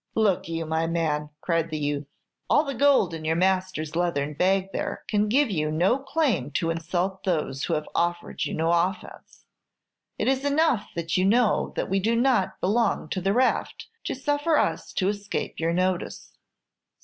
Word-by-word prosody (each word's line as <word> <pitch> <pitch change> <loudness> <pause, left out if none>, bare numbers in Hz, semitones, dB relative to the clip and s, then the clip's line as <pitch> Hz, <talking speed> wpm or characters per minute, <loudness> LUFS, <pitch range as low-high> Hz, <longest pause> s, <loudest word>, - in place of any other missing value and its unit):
"Look 205 -7 +2
you, 165 0 -3
my 160 +1 0
man," 155 -3 -1
cried 165 -2 0
the 155 - -3
youth, 145 -1 -2 0.4
"all 295 - +5
the 280 -2 -4
gold 270 -9 +3
in 160 -1 -6
your 160 +1 +1
master's 185 -3 0
leathern 150 -4 0
bag 190 +4 +1
there - - -3
can 210 0 +1
give 265 +1 +3
you 155 -4 0
no 180 - +2
claim 270 - 0
to 165 +2 0
insult 175 +3 -2
those 155 -7 -1
who - - 0
have 150 - -3
offered 175 0 -1
you - - -3
no 165 +1 +1
offence. 175 +4 -2 0.7
It - - -1
is 265 +1 +1
enough 285 -5 +2
that 165 0 -1
you 185 - +2
know 225 +2 +2
that - - -1
we 195 +1 +1
do 225 +4 +1
not 240 -5 +1
belong 210 -4 +1
to 185 - -2
the 195 +2 +1
raft 250 +4 0 0.2
to - - -2
suffer 290 +4 +1
us - - 0
to 185 - 0
escape 205 0 -3
your 165 +1 +1
notice." 185 +1 -2
185 Hz, 180 wpm, -25 LUFS, 165-225 Hz, 0.7 s, all